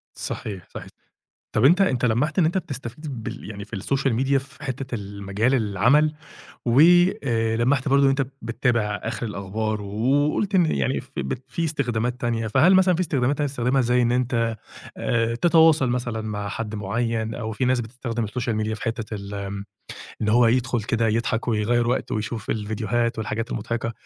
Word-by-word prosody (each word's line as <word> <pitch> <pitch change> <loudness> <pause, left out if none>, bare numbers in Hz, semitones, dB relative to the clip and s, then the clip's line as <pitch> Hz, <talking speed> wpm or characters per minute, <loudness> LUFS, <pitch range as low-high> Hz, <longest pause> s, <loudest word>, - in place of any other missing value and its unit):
صحيح 95 -5 -6
صحيح، - - -7 0.6
طَب 110 +4 +2
أنت 180 +7 +6
أنت 130 -9 +2
لمّحت 140 +9 +1
إن 165 - +5
أنت 175 +4 +1
بتستفيد 135 -4 -6
بال - - -6
يعني 100 -1 -7
في 110 - -8
الSocial 135 +6 0
Media 135 0 +3
في 140 +2 -8
حتّة 130 -2 -4
المجال 100 +4 -2
العمل، 125 +8 +3 0.5
و 120 +4 +4 0.4
آآ 115 -2 +1
لمّحت 130 +3 +1
برضه 140 +1 +4
إن - - +6
أنت 135 -1 +1 0.2
بتابع 115 -2 0
آخر 115 +1 -3
الأخبار 105 +1 -3
وقُلت 140 - 0
إن 180 -3 +5
يعني 70 - 0
ف - - -18
بت 65 - -3
فيه 170 - -2
استخدامات 125 -5 -1
تانية، 115 -2 -1
فهل 150 - +5
مثلًا 185 -1 +5
فيه 170 - -1
استخدامات 140 -3 0
تانية 150 - 0
بتستخدمها 130 0 +1
زي 125 0 +2
إن 120 0 +2
أنت 115 -2 0 0.4
آآ 115 0 0
تتواصل 160 -2 +4
مثلًا 120 -2 -2
مع 105 -2 -4
حد 110 0 -4
معين؟ 110 +2 -2
أو 110 -2 -4
فيه 130 - -1
ناس 125 -1 +2
بتستخدم 115 -1 -4
الSocial 110 -1 -2
Media 110 - -2
في - - -9
حتة 115 -2 -3
ال 100 0 -6
آآ 100 0 -5 0.6
إن 105 - 0
هو 120 +2 +5
يدخل 120 -1 +1
كده 115 +1 0
يضحك 115 +2 -1
ويغيّر 115 +2 +1
وقته 125 - -1
ويشوف 110 0 -4
الفيديوهات 110 +2 -1
والحاجات 110 +2 -3
المضحكة، 115 0 -3
120 Hz, 175 wpm, -24 LUFS, 110-135 Hz, 0.6 s, أنت